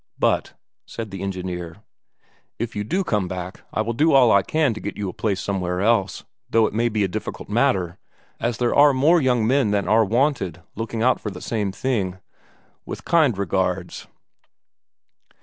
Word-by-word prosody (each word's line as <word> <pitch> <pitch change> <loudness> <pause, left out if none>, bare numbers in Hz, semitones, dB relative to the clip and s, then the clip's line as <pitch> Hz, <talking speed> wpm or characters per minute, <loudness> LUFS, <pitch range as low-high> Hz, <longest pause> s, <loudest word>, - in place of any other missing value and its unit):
"But," - - +1 0.3
said 110 -3 -6
the 95 - -6
engineer, 90 -1 -5 0.7
"if 115 0 -4
you 105 - -2
do 180 - -1
come 105 - 0
back 90 +1 -6
I - - 0
will 115 +2 -2
do 155 +7 +3
all 125 -4 +6
I 100 - +5
can 150 +1 +1
to 110 - -7
get 105 - -6
you 100 - -3
a - - -7
place 100 -4 -1
somewhere 90 -3 -2
else, 100 -2 +1 0.3
though 115 -1 +4
it - - -2
may 120 +2 +1
be 105 -2 0
a - - +2
difficult 90 - -6
matter, 90 -1 +1 0.4
as 120 -1 -1
there 120 -1 +1
are 145 -1 +6
more 160 +6 +4
young 125 -4 +2
men 130 -1 +2
than 100 -1 0
are 110 +1 +5
wanted 110 - 0
looking 115 +1 -3
out 130 +1 +3
for 105 - -3
the 95 - -8
same 105 -4 -2
thing. 95 -5 -2 0.7
With - - -8
kind 155 - +3
regards...." 95 -1 -2
105 Hz, 185 wpm, -22 LUFS, 95-120 Hz, 0.7 s, all